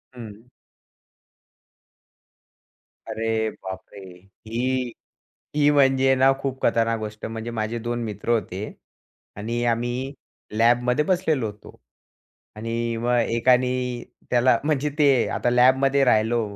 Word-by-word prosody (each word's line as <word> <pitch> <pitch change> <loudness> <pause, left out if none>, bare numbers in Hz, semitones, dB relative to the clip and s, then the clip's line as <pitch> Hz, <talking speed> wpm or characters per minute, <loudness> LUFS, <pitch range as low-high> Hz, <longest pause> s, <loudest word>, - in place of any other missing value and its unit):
हं. 115 0 -11 2.6
अरे, 110 0 -1
बापरे! 95 +1 -8 0.5
ही 125 +2 -1 0.6
ही 145 -1 +4
म्हणजे 135 -2 +4
ना, 135 +1 +5
खूप 135 -1 -4
खतरनाक 115 -1 +1
गोष्ट. 105 0 -6
म्हणजे 115 +1 -5
माझे 115 +1 -3
2 120 +1 -3
मित्र 105 0 -6
होते 105 -4 -1 0.7
आणि 115 +3 -3
आम्ही 120 +3 -1 0.4
लॅबमध्ये 120 +5 +3
बसलेलो 160 -9 +1
होतो 105 0 -12 0.8
आणि 115 +1 -3
मग 120 +1 +1
एकाने 125 +1 +1 0.3
त्याला, 125 0 +4
म्हणजे 150 -1 0
ते 135 -5 +4
आता 120 - 0
लॅबमध्ये 130 +3 +4
राहिलो 115 +1 +3
120 Hz, 105 wpm, -23 LUFS, 115-130 Hz, 2.6 s, ना